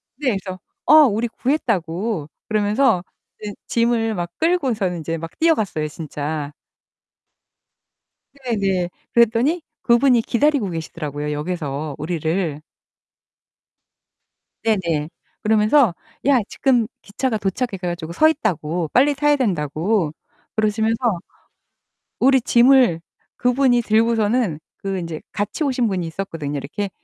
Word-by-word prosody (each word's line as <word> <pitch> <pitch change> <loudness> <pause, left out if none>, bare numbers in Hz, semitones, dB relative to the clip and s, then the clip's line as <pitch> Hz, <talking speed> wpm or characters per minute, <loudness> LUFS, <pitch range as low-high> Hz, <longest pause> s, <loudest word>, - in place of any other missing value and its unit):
네 275 0 -1
그래서 185 -1 -7 0.3
어 295 - +5
우리 225 +2 0
구했다고 205 - -1 0.2
그러면서 215 -1 +2 0.4
이제 205 -1 -5
짐을 230 -1 +1
막 175 -2 -3
끌고서는 245 - 0
이제 165 +2 -3
막 165 0 -8
뛰어갔어요, 215 - +1
진짜. 150 -1 -5 1.9
네 235 -3 0
네. 190 -3 0 0.2
그랬더니 240 +8 +3 0.2
그분이 240 0 +4
기다리고 260 -4 +1
계시더라고요, 150 -3 -4
역에서 150 -2 -3
우리를. 160 0 -2 2.0
네네. 170 -9 0 0.3
그러면서 215 - +4 0.3
야 275 -3 +5
지금 250 -5 +2 0.2
기차가 225 +3 -2
도착해 200 +2 -2
가지고 175 -2 -4
서있다고 175 - +1
빨리 285 +3 +4
타야 295 +1 +3
된다고 170 - 0 0.4
그러시면서 220 0 +1 1.0
우리 265 0 +4
짐을 240 -8 +5 0.4
그분이 250 0 +3
들고서는 220 -5 +1 0.2
그 195 -1 -2
인제 165 -3 -5
같이 210 +9 -2
오신 255 -4 +1
분이 185 -3 -2
있었거든요. 160 -5 -4
이렇게 195 +9 -4
205 Hz, 270 characters per minute, -21 LUFS, 165-240 Hz, 2.0 s, 어